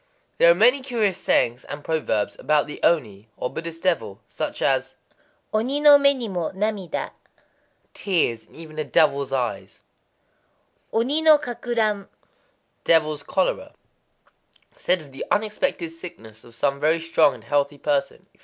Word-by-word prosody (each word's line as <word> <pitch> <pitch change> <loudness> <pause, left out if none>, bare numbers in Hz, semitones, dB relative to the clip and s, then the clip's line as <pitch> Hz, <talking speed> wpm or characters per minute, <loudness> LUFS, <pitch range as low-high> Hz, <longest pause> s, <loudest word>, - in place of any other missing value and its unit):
There 170 - +7
are 170 - +6
many 245 +8 +4
curious 220 -8 -1
sayings 120 +2 +1
and 145 0 -8
proverbs 130 -10 -1
about 150 +2 +2
the 150 - -9
oni, 110 -10 0
or 125 - -3
Buddhist 165 0 -6
devil,—such 115 - -2
as - - 0 0.6
Oni 250 +7 0
no 295 -1 +8
mé 280 0 +4
ni 245 -3 -5
mo 180 -5 -2
namida, 200 -2 -3 0.8
"tears 160 - -1
in - - -20
even 155 -1 -9
a - - 0
devil's 140 -2 +2
eyes;"—Oni 225 - -5
no 315 -1 +7
kakuran, 235 -6 -2 0.8
"devil's 155 -3 +2
cholera" 190 +5 -2 1.0
(said 180 -1 0
of 140 - -16
the 135 - -6
unexpected 210 -4 -1
sickness 165 - -11
of 120 -1 -15
some 140 +3 0
very 160 +3 +2
strong 165 -3 +2
and 115 - -14
healthy 145 +4 0
person), 140 -1 -2
etc. - - -32
165 Hz, 140 wpm, -23 LUFS, 140-215 Hz, 1.0 s, no